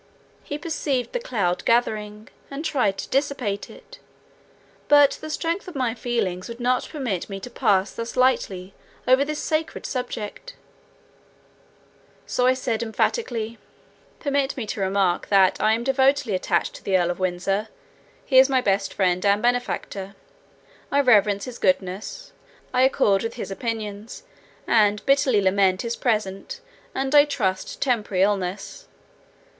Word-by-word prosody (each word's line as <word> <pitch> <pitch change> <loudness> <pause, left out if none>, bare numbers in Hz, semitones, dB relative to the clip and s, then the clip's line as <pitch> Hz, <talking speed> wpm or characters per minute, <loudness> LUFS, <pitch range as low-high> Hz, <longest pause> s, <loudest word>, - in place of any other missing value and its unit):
He 290 - -5
perceived 295 -6 -2
the - - 0
cloud 195 - -1
gathering, 215 -2 0 0.2
and 280 +3 -6
tried 225 -11 +1
to - - -6
dissipate 265 -8 -1
it; - - -14 0.9
but 290 -1 +5
the 310 - -6
strength 335 +5 -2
of 360 - -9
my 250 -4 0
feelings 225 -6 -2
would 235 +1 -8
not 250 +1 0
permit 245 - -3
me 195 -1 -5
to 245 +6 -9
pass 200 -5 +1
thus 230 0 -6
lightly 195 -7 +1 0.3
over 260 +2 +5
this 305 +1 -4
sacred 315 +1 -2
subject; 250 - -5 1.7
so 250 - +1
I 255 - +4
said 235 -3 -2
emphatically, 230 - -2 0.6
"Permit 280 -2 -1
me 245 - -3
to 210 - -4
remark, 190 -2 +1
that 195 -2 +4
I 215 +1 +4
am 230 +1 -1
devotedly 270 -2 +2
attached 185 - 0
to - - -17
the 190 -1 +2
Earl 175 -1 +1
of 175 - -6
Windsor; 185 +3 -1 0.6
he 260 -2 +5
is 265 +1 +6
my 265 -1 +3
best 195 -4 0
friend 185 -2 +1
and 200 0 +3
benefactor. 225 -5 -2 0.8
I 280 - +3
reverence 210 -6 +3
his 250 -2 -8
goodness, 190 - -1 0.4
I 250 - +3
accord 205 -7 +3
with 230 0 -4
his 200 -5 -6
opinions, 215 - -5 0.4
and 210 -2 +3
bitterly 275 -6 +3
lament 190 -1 +2
his 235 0 -2
present, 215 - -2 0.4
and 270 +1 -1
I 290 0 +8
trust 195 -10 -2
temporary, 210 -7 +1
illness. 200 - -2
225 Hz, 145 wpm, -23 LUFS, 195-265 Hz, 1.7 s, I